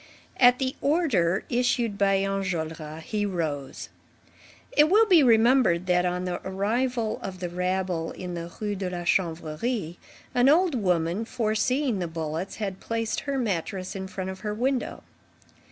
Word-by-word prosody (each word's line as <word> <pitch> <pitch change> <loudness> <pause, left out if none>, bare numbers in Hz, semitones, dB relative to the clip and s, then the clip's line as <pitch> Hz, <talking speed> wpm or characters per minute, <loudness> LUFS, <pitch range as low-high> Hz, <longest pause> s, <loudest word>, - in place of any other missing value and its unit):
At 245 -1 +6
the 260 0 -2
order 250 - +2
issued 240 -3 +1
by 195 -1 +3
Enjolras, 160 -5 -3
he 210 +3 -2
rose. 155 -8 -3 0.8
It 300 +1 +5
will 430 +4 +6
be 365 -7 +6
remembered 230 -7 +4
that, 180 0 +2
on 180 +1 -2
the 180 -1 -3
arrival 220 +4 -1
of 185 -1 -6
the 180 -1 -3
rabble 180 -1 -1
in 180 -1 -6
the 170 0 -6
Rue 210 -1 -2
de 190 -1 -3
la 175 -1 -4
Chanvrerie, 170 +3 -1 0.4
an 250 +2 +4
old 340 +2 +4
woman, 180 -3 0
foreseeing 235 +1 0
the 175 - -2
bullets, 160 +2 -4
had 195 -3 -4
placed 225 -1 -2
her 280 -1 -3
mattress 190 -5 -2
in 190 -1 -4
front 190 -1 -5
of 190 - -9
her 210 0 -3
window. 255 +2 -1
195 Hz, 155 wpm, -26 LUFS, 175-240 Hz, 0.8 s, At